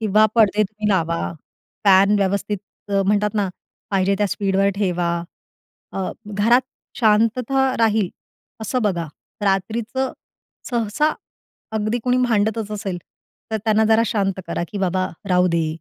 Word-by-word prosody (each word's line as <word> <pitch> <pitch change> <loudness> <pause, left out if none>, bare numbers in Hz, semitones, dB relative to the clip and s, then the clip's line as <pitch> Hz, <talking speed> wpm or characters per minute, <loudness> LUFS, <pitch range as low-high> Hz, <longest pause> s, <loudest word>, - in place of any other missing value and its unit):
किंवा 215 0 +4
पडदे 215 -2 +4
तुम्ही 210 +1 -3
लावा. 170 -4 0 0.5
फॅन 195 +1 +6
व्यवस्थित 200 +1 0 0.3
अ, 200 -1 +2
म्हणतात 210 +1 +1
ना 205 -3 +1 0.4
पाहिजे 195 0 +2
त्या 205 - +2
स्पीडवर 195 0 +1
ठेवा. 180 -4 0 0.8
अ, 190 -1 -2 0.2
घरात 210 +4 +3 0.4
शांतता 245 +4 +2
राहील 220 -4 +2 0.5
असं 240 +3 -1
बघा. 175 -6 0 0.4
रात्रीचं 225 +6 -1 0.6
सहसा 240 +6 +1 0.6
अगदी 215 +2 0
कोणी 250 0 +2
भांडतच 220 -1 0
असेल, 200 -4 -3 0.5
तर 220 - 0
त्यांना 220 0 +3
जरा 220 +1 +4
शांत 195 -4 -1
करा 170 0 -2
की, 205 - -5
"बाबा, 185 -1 0 0.2
राहू 180 0 +4
दे. 165 -2 +1
210 Hz, 130 wpm, -21 LUFS, 195-220 Hz, 0.8 s, फॅन